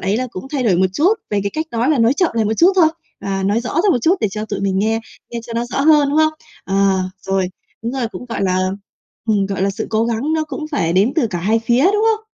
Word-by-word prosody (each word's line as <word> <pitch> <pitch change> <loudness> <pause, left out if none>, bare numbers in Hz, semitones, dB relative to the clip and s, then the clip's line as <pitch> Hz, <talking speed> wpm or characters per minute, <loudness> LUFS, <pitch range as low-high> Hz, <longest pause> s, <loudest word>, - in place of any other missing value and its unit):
ấy 195 +3 0
là 255 +1 -1
cũng 185 +6 -7
thay 270 -3 0
đổi 195 -7 +3
một 185 +1 +3
chút 355 - +3 0.2
về 205 -1 +1
cái 200 - -2
cách 315 +1 -2
nói, 235 +2 0
mà 300 -4 +2
nói 230 +2 +4
chậm 340 +3 +1
lại 225 - +1
một 220 +1 0
chút 360 +3 +5
thôi, 335 -4 +6 0.3
à, 195 -1 -2
nói 205 +4 +1
rõ 245 - -5
ra 350 +6 +2
một 250 - +1
chút 345 +4 +4
để 215 - +1
cho 215 +1 -4
tụi 205 -2 -4
mình 195 -1 0
nghe, 220 +2 +1 0.3
nghe 235 -1 -4
cho 235 - -7
nó 235 +1 -1
rõ 245 +3 -3
hơn, 295 -1 +5
đúng 300 - +1
không? 310 0 +4 0.3
Ờ, 195 - -3 0.5
rồi, 190 -1 -1 0.3
đúng 235 +2 -3
rồi, 250 -4 -2
cũng, 245 - -8
gọi 230 - -3
là, 185 -1 +1 0.7
ừm, 200 -2 +2
gọi 195 -1 -3
là, 200 - +2
sự 210 +3 -4
cố 220 +1 +2
gắng 235 +7 -1
nó 315 -1 +1
cũng 305 +1 -6
phải 170 - 0
đến 200 +8 +3
từ 265 -8 +3
cả 185 -5 -4
hai 215 +6 +1
phía, 240 +5 +2
đúng 415 +3 +3
không? 440 - -26
230 Hz, 285 wpm, -18 LUFS, 200-290 Hz, 0.7 s, thôi